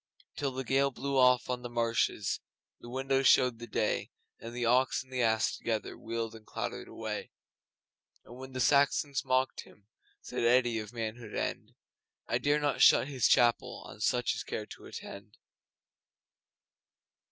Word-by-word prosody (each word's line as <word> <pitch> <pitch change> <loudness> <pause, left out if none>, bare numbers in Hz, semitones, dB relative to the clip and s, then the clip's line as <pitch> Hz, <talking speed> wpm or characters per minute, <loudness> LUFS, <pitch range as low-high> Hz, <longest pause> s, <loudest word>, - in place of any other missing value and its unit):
Till 140 -2 -2
the 130 +1 -4
gale 135 +2 +2
blew 140 +1 -4
off 125 -1 +5
on 125 -1 -2
the 120 - -6
marshes 115 -1 0 0.4
And - - -14
the - - -9
windows 135 +1 +1
showed 125 -3 +4
the 120 - -8
day, - - -1 0.3
And 115 - -8
the 120 0 -2
Ox 125 +3 +2
and 130 0 -17
the 125 - 0
Ass 110 -1 +2
together 110 -3 -3
Wheeled 115 0 -4
and 110 -1 -12
clattered - - -5
away. - - -5 1.0
And 120 - -12
when 130 +1 -10
the 130 - -4
Saxons 140 -1 +3
mocked 130 0 0
him, 100 - -19 0.3
Said - - -5
Eddi 120 -1 +3
of 105 -1 -7
Manhood 115 -1 -5
End, - - -3 0.5
'I 120 - +1
dare 145 +3 +2
not 145 -1 0
shut 135 - +6
His 130 -4 +2
chapel 120 -1 +2
On - - -11
such - - +1
as - - -4
care - - -5
to - - -12
attend. 100 +1 -10
125 Hz, 165 wpm, -31 LUFS, 115-130 Hz, 1.0 s, shut